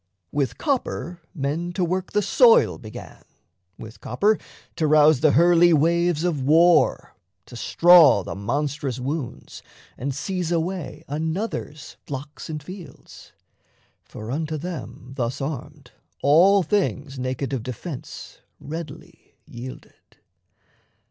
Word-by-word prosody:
With 135 -5 -1
copper 180 - -2
men 160 +4 -3
to 180 0 0
work 185 +2 -3
the 210 0 +2
soil 235 +3 +4
began, 110 -1 -11 0.6
With 110 +1 -11
copper 205 - +1 0.4
to 155 - +1
rouse 150 -1 +5
the 150 0 +3
hurly 170 +2 +5
waves 170 +1 +2
of 170 -6 -1
war, 165 +5 +3 0.3
To 120 - -13
straw 165 - +6
the - - -6
monstrous 140 +4 -3
wounds, 135 -1 -5 0.4
and 140 +3 -2
seize 180 +3 -3
away 170 0 -3
Another's 160 0 -4
flocks 140 +2 -7
and 155 -2 -5
fields. 175 -4 -12 0.7
For 110 +2 -9
unto 155 +2 -3
them, 155 -5 -7
Thus 120 -1 -2
armed, 140 -2 -6 0.3
all 180 +7 +5
things 150 -7 -1
naked 130 +1 -3
of 130 - -2
defence 130 +4 -8 0.2
Readily 155 0 -9
yielded. 125 +2 -12
155 Hz, 115 wpm, -23 LUFS, 135-175 Hz, 0.7 s, straw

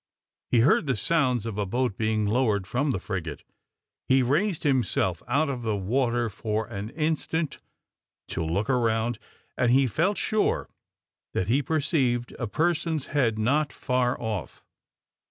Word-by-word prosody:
He 120 - +4
heard 145 +4 +4
the 135 - +2
sounds 125 -3 +1
of 110 -2 -4
a 105 - 0
boat 120 +1 0
being 110 -1 0
lowered 105 -3 +1
from 130 +8 0
the 130 - +1
frigate. 85 -6 -5 0.6
He 130 0 +4
raised 160 - +1
himself 120 - +1
out 140 +6 +2
of 130 -3 -3
the 110 -2 -1
water 120 +4 +1
for 110 +1 -2
an 105 -2 -6
instant 160 +1 -1 0.7
to - - -2
look 90 +7 -1
around, 115 -2 +1 0.4
and 125 -2 +2
he 135 +2 +5
felt 170 - +1
sure 215 -1 +1 0.7
that 90 - -1
he 135 +5 +3
perceived 135 -5 0
a 120 - -2
person's 160 +2 0
head 120 -7 +2
not 140 +7 +1
far 125 -1 0
off. 110 -7 -4
120 Hz, 150 wpm, -26 LUFS, 110-140 Hz, 0.7 s, he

